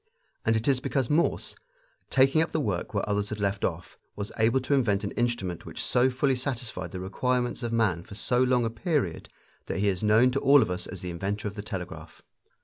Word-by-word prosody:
And 115 - +2
it 110 +1 -1
is 135 -2 +3
because 130 -1 -1
Morse, 160 +3 +1 0.5
taking 135 +4 +4
up 165 - -1
the 160 - +1
work 100 - -2
where 100 -1 -1
others 105 0 0
had 110 - -5
left 100 -1 -1
off, 90 0 -3 0.2
was 100 0 -5
able 115 +4 +4
to 130 - -1
invent 110 -7 +2
an 100 - -3
instrument 120 -8 -2
which - - -3
so 125 +1 +4
fully 135 +1 +1
satisfied 120 -8 -4
the 90 - -6
requirements 120 +7 -1
of 120 -1 -3
man 105 -8 +1
for 100 - -11
so 125 +4 +1
long 125 -2 +3
a 115 - -1
period 115 - -2 0.4
that - - -3
he 100 +1 +2
is 95 -2 -2
known 110 +4 +5
to 135 - 0
all 140 0 +6
of - - -3
us 90 - -4
as 95 - -8
the 90 - -4
inventor 100 +5 -3
of 100 - -5
the 105 - -6
telegraph. 95 -4 -7
115 Hz, 225 wpm, -27 LUFS, 100-130 Hz, 0.5 s, all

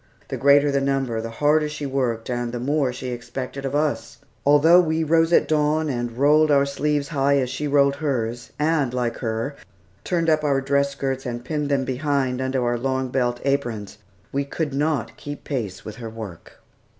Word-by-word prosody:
The - - -3
greater 140 +1 +5
the 140 0 +1
number, 135 -4 0
the 115 - -5
harder 150 +5 +2
she 150 -1 -5
worked, 125 -4 -1
and 120 -1 -2
the 120 - -4
more 140 +1 +1
she 125 +1 -6
expected 125 +3 -5
of 135 +1 -2
us. 150 0 -1 0.3
Although 160 +5 +7
we 160 -1 0
rose 165 +1 +3
at - - +4
dawn, 155 0 +1
and 120 -2 -3
rolled 150 +3 +4
our 140 -1 +4
sleeves 145 0 -1
high 140 -2 +2
as 130 -2 0
she 150 +3 -3
rolled 140 -1 +3
hers, 120 -4 -2
and 150 -4 +1
like 120 -2 -1
her, 115 +4 -3 0.5
turned 170 -2 0
up 155 -1 +3
our 140 -2 +2
dress 140 +1 +1
skirts 135 -1 -3
and 120 -1 -5
pinned 150 0 -2
them 135 -2 +1
behind 130 -1 -1
under 130 -1 0
our 120 0 0
long 130 0 -1
belt 120 -1 0
aprons, 115 -7 -2 0.3
we 140 +1 0
could 145 +1 -3
not 145 -2 -1
keep 145 0 -8
pace 115 -10 -4
with 110 - -7
her 115 -2 -6
work. 110 -6 -9
140 Hz, 190 wpm, -23 LUFS, 125-150 Hz, 0.5 s, Although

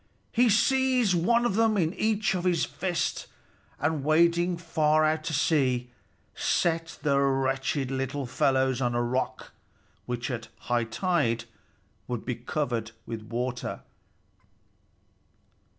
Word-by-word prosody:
He 240 0 +4
seized 255 -1 +3
one 235 +8 +2
of 240 - +1
them 220 0 +3
in 165 -2 +1
each 215 -2 +1
big 180 -1 +2
fist, 175 +2 -2 0.5
and 145 0 0
wading 170 +3 +3
far 155 -2 +2
out 155 0 +1
to 165 - -2
sea, 130 -5 +1 0.4
set 165 -1 0
the 140 -2 +3
wretched 135 0 0
little 135 +1 -2
fellows 130 +1 +1
on 120 -1 0
a 120 - +1
rock 125 +2 -2 0.6
which 125 +2 -3
at 115 -2 -5
high 120 -1 0
tide 115 -4 0 0.6
would 120 -3 -4
be 125 - -1
covered 120 -2 -3
with 115 -1 -5
water. 120 +3 -4
145 Hz, 120 wpm, -27 LUFS, 125-175 Hz, 0.6 s, He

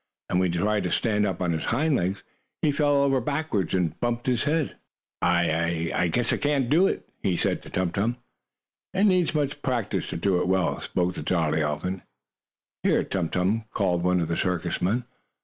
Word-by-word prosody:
And 90 - +2
when 90 -1 +2
he 85 - -2
tried 105 +3 +1
to - - -1
stand 105 -3 +1
on 90 -2 -1
his 80 - -2
hind 145 +5 +1
legs, 95 -1 -1 0.4
he 150 - +4
fell 145 -1 +3
over 135 -2 +2
backward 140 - -1
and 85 -4 -1
bumped 120 0 -1
his 125 -1 +1
head. 155 0 0 0.5
"I 85 -1 +1
I 85 - +2
guess 120 +8 +1
I - - +1
can't 140 -3 0
do 175 +6 +5
it," - - -3
he 90 -3 +1
said - - 0
to - - -12
Tum 90 -1 -1
Tum. 115 +6 0 0.8
"It 195 - +3
needs 185 -5 +3
much 145 -1 -1
practice 125 -7 -1
to - - -3
do 90 +1 +1
it - - -1
well," 95 -1 +1
spoke 90 0 -1
the - - -6
jolly 80 -3 +1
elephant. 75 +5 -2 0.8
"Here, - - +2
Tum 90 -4 -2
Tum!" 100 +5 0
called 90 -4 +1
one 90 0 +3
of 85 - -1
the 85 - -1
circus 90 -2 -1
men. 110 +7 +1
95 Hz, 200 wpm, -26 LUFS, 90-130 Hz, 0.8 s, do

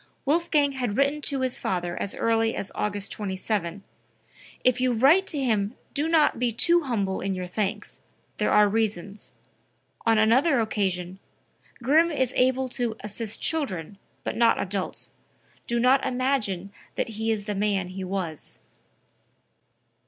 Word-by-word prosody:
Wolfgang 300 -1 +2
had 245 -6 -3
written 280 +2 +2
to 275 -1 -1
his 260 -1 0
father 175 -2 -2
as 200 - -2
early 225 0 +1
as 200 - -4
August 205 -1 -2
27: 195 -2 -3 0.8
"If 255 0 +3
you 255 -1 +2
write 290 - +5
to 300 - 0
him 220 -4 0 0.2
do 295 +2 0
not 320 -7 +3
be 245 -1 +1
too 340 +10 +3
humble 200 -7 -1
in 195 0 -2
your 185 0 -4
thanks; 210 +3 -4 0.4
there - - +1
are 210 0 +5
reasons." 205 -2 -2 0.7
On 225 -1 +3
another 250 +6 +4
occasion: 190 -4 -1 0.6
"Grimm 315 +7 +4
is 260 -6 0
able 260 +1 +2
to 240 -2 -2
assist 210 +1 -4
children, 200 - -2 0.2
but - - -3
not 235 0 +3
adults. 190 -1 -4 0.6
Do 235 0 0
not 255 +3 +4
imagine 245 -8 -1 0.2
that - - -1
he 220 +1 -3
is 215 -2 -1
the 210 - -2
man 195 -2 0
he 190 +1 -6
was.") 185 -5 -4
225 Hz, 145 wpm, -26 LUFS, 200-260 Hz, 0.8 s, write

